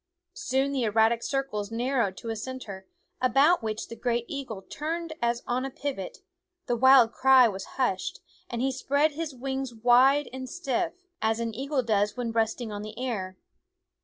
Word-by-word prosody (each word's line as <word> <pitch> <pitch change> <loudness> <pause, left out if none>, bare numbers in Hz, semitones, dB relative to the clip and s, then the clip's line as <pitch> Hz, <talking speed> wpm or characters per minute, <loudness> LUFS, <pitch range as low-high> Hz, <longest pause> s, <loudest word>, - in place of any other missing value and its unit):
Soon 270 +1 0
the 270 -2 -1
erratic 225 +1 +3
circles 235 -7 -2
narrowed 235 -4 0
to 230 - -5
a - - -3
cen 260 +4 -5
ter, 190 -6 -9 0.3
about 275 +7 +4
which 220 -1 -3
the 230 - -8
great 240 -1 -1
eagle 255 -9 -6
turned 325 - -4
as 235 0 0
on 245 +1 0
THE 270 - -3
WOODS 265 - -23
a - - -24
pivot; 260 -11 -3 0.5
the 240 - 0
wild 255 -1 +6
cry 260 -1 +6
was 195 -3 -5
hushed, 240 -8 -1 0.3
and 240 0 -2
he 270 - +1
spread 285 +3 +1
his 305 -1 -5
wings 265 -1 -4
wide 250 +5 +5
and 260 -1 -6
stiff, 345 0 -2 0.3
as 220 +1 +1
an 230 -1 -2
eagle 270 +3 -1
does 210 -1 +1
when 240 -2 -2
resting 225 0 -1
on 205 0 -5
the 215 +1 -8
air. 205 -7 -3
245 Hz, 185 wpm, -27 LUFS, 225-270 Hz, 0.5 s, wild